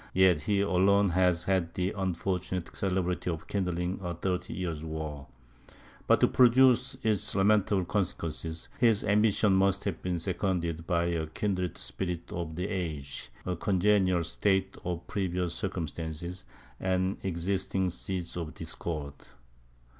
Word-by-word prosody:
yet 90 -4 +5
he 100 +6 +1
alone 100 +1 +4
has 90 -1 +2
had 90 -3 0
the 90 +1 0
unfortunate 90 -2 -2
celebrity 90 -2 -1
of 80 -2 -3
kindling 90 -1 -1
a 90 -2 -3
thirty 90 +1 -2
years' 85 -4 -3
war; 80 -3 -5 0.8
but - - +5
to - - +5
produce 130 +1 +5
its 110 -4 +1
lamentable 100 -1 +3
consequences, 85 -4 -3
his 115 -4 +4
ambition 105 0 +3
must 95 +1 +3
have 100 -5 -3
been 90 -1 -1
seconded 85 -2 -1
by 85 -2 +2
a 85 -2 -1
kindred 90 +1 -2
spirit 90 -3 -4
of 85 -2 -4
the 90 +3 -2
age, 75 - -4 0.2
a 90 - -1
congenial 95 -1 +2
state 95 +3 0
of 85 -1 -3
previous 90 -3 -1
circumstances, 85 -2 -4 0.3
and 95 +1 0
existing 95 +1 -1
seeds 90 0 -4
of 85 -3 -5
discord. 75 -4 -4
90 Hz, 130 wpm, -29 LUFS, 85-95 Hz, 0.8 s, yet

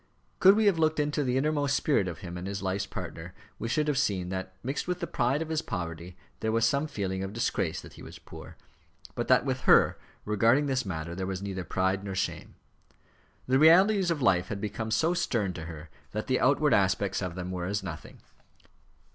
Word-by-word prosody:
Could 190 +2 +7
we 220 0 +2
have 195 -5 +3
looked 155 -1 +2
into 150 0 0
the 125 -1 0
innermost 145 0 +1
spirit 135 -11 +1
of 85 -3 -6
him 85 0 -6
and 90 +2 -5
his 100 0 -4
life's 95 +1 -1
partner, 85 +3 -7 0.2
we 115 - -3
should 150 +6 0
have 145 -3 +1
seen 95 -9 0
that 95 0 -5
mixed 135 +6 -3
with 180 -1 -2
the 170 - -2
pride 135 +1 0
of 160 - -10
his 160 -1 0
poverty 85 - -6 0.2
there 110 - -1
was 115 0 +2
some 140 +6 +1
feeling 95 -8 -3
of 95 +1 -5
disgrace 115 - -1
that - - -13
he - - -13
was - - -10
poor, - - -12 0.6
but - - -3
that - - +4
with - - -1
her, - - +5 0.3
regarding 115 +7 +3
this 130 -5 -1
matter, 85 -2 -4
there 95 +1 -4
was 95 0 -4
neither 95 -2 -4
pride 95 +3 -1
nor 100 -1 -5
shame. 95 - -3 0.9
The 130 +1 +3
realities 185 +5 +6
of 155 -5 -1
life 90 -6 +3
had 105 - -4
become 105 +2 -4
so 160 +10 +2
stern 115 - -1
to 80 -2 -7
her 80 -2 -9 0.2
that - - -3
the - - +1
outward - - +3
aspects - - +1
of 90 -2 -4
them 90 0 -5
were 90 -1 -3
as 100 +1 -2
nothing. 80 -4 -8
105 Hz, 215 wpm, -28 LUFS, 95-145 Hz, 0.9 s, Could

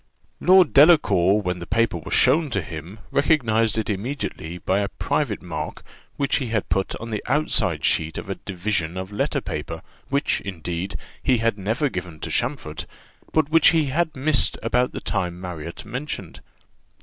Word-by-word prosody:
Lord 185 -3 +5
Delacour, 105 - +5
when 90 -1 -2
the 85 - -7
paper 110 -3 +1
was - - -2
shown 155 -1 +4
to 120 - -1
him, 85 +6 -8
recognized 115 -8 +2
it 110 - -1
immediately 100 - -4
by 95 +2 0
a 100 - 0
private 110 0 -2
mark 80 -4 -5 0.3
which 140 -1 +1
he 130 - -2
had 110 -3 -1
put 95 +2 0
on 115 0 -7
the 105 - -3
outside 110 - +1
sheet 80 0 +1
of - - -6
a 95 - -2
division 95 -3 -3
of 95 +1 -5
letter 105 - -1
paper, 80 +2 -5 0.3
which, 140 +2 +1
indeed, 90 0 -4 0.3
he 130 -2 +3
had 115 -1 +1
never 110 +10 0
given 90 - -6
to - - -4
Champfort, 120 - -2 0.4
but 155 -2 +2
which 165 -1 +6
he 160 -3 +5
had 170 0 0
missed 135 +1 +2
about 125 +2 +1
the - - -6
time 90 -4 -2
Marriott 85 -2 -7
mentioned. 120 - -6
105 Hz, 170 wpm, -23 LUFS, 90-135 Hz, 0.4 s, which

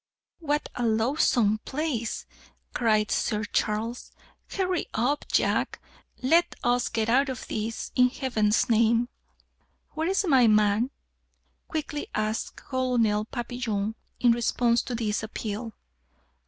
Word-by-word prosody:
"What 295 -2 -1
a 245 - -3
loathsome 225 -1 +2
place!" 265 -4 -3 0.5
cried 215 -3 +2
Sir 210 0 0
Charles. 220 +3 -2 0.4
"Hurry 370 -2 -1
up, 255 +6 0
Jack! - - +1 0.4
let 330 +7 +3
us 245 0 +2
get 220 -1 -1
out 270 +4 +3
of 255 -3 -6
this, 220 +1 -4
in 250 0 +5
Heaven's 225 -6 +1
name!" 230 +1 +3 0.8
"Where's 355 +6 0
my 265 -8 +5
man?" 215 +2 +3 0.8
quickly 300 -2 -4
asked 215 +1 -2
Colonel 240 -5 0
Papillon 230 -3 -3 0.3
in 245 - +5
response 235 0 +2
to 250 - -5
this 215 -2 -1
appeal. 220 +1 -5
235 Hz, 115 wpm, -27 LUFS, 220-260 Hz, 0.8 s, in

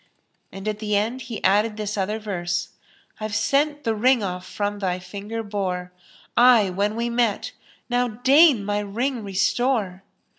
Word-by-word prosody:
And 195 +2 -8
at 215 -1 -2
the 210 -1 -1
end 225 +6 0
he 225 - -6
added 210 +3 +2
this 210 0 -3
other 205 +2 -1
verse, 190 -4 -3 0.5
"I've 215 -1 -4
sent 290 +1 +1
the 225 - +1
ring 245 +3 +3 0.2
from 205 +3 -3
off 205 - -10
thy 185 -2 -1
finger 205 +5 -6
bore 185 -4 -3 0.3
* - - -29 0.2
I 205 -5 +2
when 205 +3 -1
we 235 +1 -1
met, 235 -3 0 0.4
now 245 0 +1
deign 260 +1 +4
my 205 0 0
ring 230 +4 -2
restore!" 200 0 0
210 Hz, 160 wpm, -23 LUFS, 200-235 Hz, 0.5 s, deign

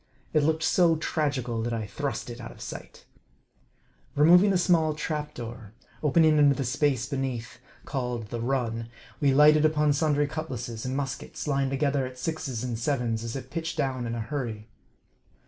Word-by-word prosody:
It 155 - +4
looked 160 +2 +1
so 170 0 +4
tragical 140 -7 -1
that 120 +1 -2
I 110 -2 -3
thrust 130 +4 -4
it 120 +1 -8
out 115 - -7
of - - -15
sight, - - -9
xj - - -19
Removing 180 +6 +7
a 190 - +3
small 165 -4 +3
trap 150 0 -3
door, 115 -3 -8 0.3
opening 155 +1 +4
into 145 -1 +5
the 135 - -2
space 130 0 +1
be 140 -1 -3
neath, 125 -2 -4 0.3
called 125 -5 -3
the 120 - -4
"run," 115 -2 -1 0.3
we 140 -2 +3
lighted 150 +2 +6
upon 150 -1 +3
sundry 145 0 +2
cutlasses 125 -7 -5
and 130 +1 -2
muskets, 140 +2 -4
lying 140 -2 +1
together 140 0 +1
at 130 0 -11
sixes 130 -4 -3
and 120 -3 -3
sevens, 120 -3 -1
as 115 +1 -5
if 130 -1 -7
pitched 165 0 -4
down 130 -4 -1
in 115 - -3
a 115 - -3
hurry. 115 -4 -4
135 Hz, 180 wpm, -27 LUFS, 120-150 Hz, 0.3 s, Removing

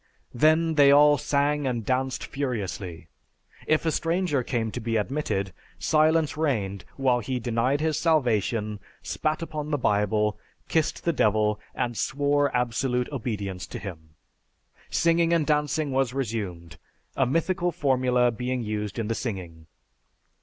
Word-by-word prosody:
Then 155 +5 +3
they 145 -2 +6
all 145 +1 +6
sang 145 0 +1
and 120 -4 -2
danced 130 0 -1
furiously. 100 - -4 0.6
If 155 +1 +2
a 160 - +2
stranger 165 -3 0
came 115 -2 -2
to 125 - -4
be 115 -1 -2
admitted, 105 -5 -2 0.2
silence 155 0 +2
reigned 110 - -1
while 130 -3 +2
he 130 +2 -3
denied 120 +5 0
his 155 -1 0
salvation, 115 - +1 0.2
spat 155 +2 -2
upon 155 -2 -5
the 145 - +1
Bible, 105 -2 +1 0.3
kissed 160 -2 0
the 170 - +2
Devil, 105 -4 +2 0.2
and 120 -1 -2
swore 145 +5 +1
absolute 125 +1 -1
obedience 105 -8 -4
to - - -7
him. 80 -5 -9 0.7
Singing 170 0 +2
and 165 -3 +2
dancing 150 0 0
was 130 -1 0
resumed, 100 - -4 0.4
a 135 - +2
mythical 175 +5 0
formula 130 -6 +2
being 125 +2 -3
used 105 -2 -3
in 115 -2 -2
the 115 - 0
singing. 90 -9 -6
125 Hz, 140 wpm, -26 LUFS, 105-150 Hz, 0.7 s, they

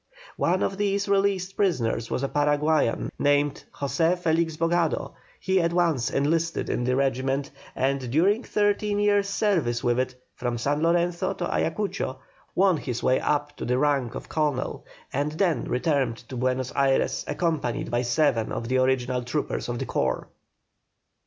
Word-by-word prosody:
One 185 +2 +1
of 195 - -1
these 200 0 0
released 195 -1 +1
prisoners 120 - 0
was 130 - -2
a - - +1
Paraguayan 145 -2 +1
named 145 0 +2
José 160 +6 0
Felix 165 -2 0
Bogado; 165 0 0 0.3
he 190 -1 +2
at 170 0 0
once 165 -9 +2
enlisted 160 +4 0
in 120 - -1
the 125 0 +1
regiment, 135 +1 0 0.2
and 135 -1 0
during 195 - +3
thirteen 205 -2 0
years' 205 -1 +2
service 170 - +1
with 120 0 +2
it, 130 0 -1 0.2
from 120 -1 -3
San 145 +5 0
Lorenzo 170 +1 +1
to - - -3
Ayacucho, - - -1 0.4
won 190 -3 +4
his 125 -4 -4
way 130 - +3
up 145 0 -1
to - - -6
the 125 +1 +1
rank 135 -4 +1
of - - -7
Colonel, 150 -5 -2 0.3
and 145 +3 -1
then 170 0 +1
returned 130 -3 0
to 130 - -6
Buenos 130 +1 -1
Ayres, 135 -1 +2
accompanied 160 -8 -1
by 120 0 +1
seven 120 -2 +1
of 115 - -4
the 130 0 +2
original 130 -1 +1
troopers 120 +1 -3
of 120 - -2
the - - -3
corps. - - -1
145 Hz, 160 wpm, -26 LUFS, 130-175 Hz, 0.4 s, won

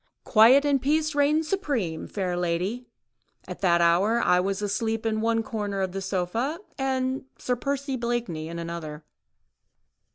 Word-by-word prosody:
"Quiet 245 +6 +6
and 280 -2 +2
peace 310 +2 +1
reigned 295 +2 +2
supreme, 275 - -2
fair 185 -3 -2
lady; 180 +8 -2 0.6
at 180 - -8
that 170 -3 +3
hour 185 +7 +3
I 180 -6 +3
was 195 +2 -1
asleep 220 +2 -1
in 220 -1 0
the 225 0 +1
corner 205 -3 -3
of 190 -1 -2
one 195 - -3
sofa 195 - -2 0.2
and 265 0 -1
Sir 250 - -1
Percy 275 +1 -2
Blakeney 235 -10 -2
in 170 - -6
another." 165 -2 -6
220 Hz, 150 wpm, -26 LUFS, 180-265 Hz, 0.6 s, Quiet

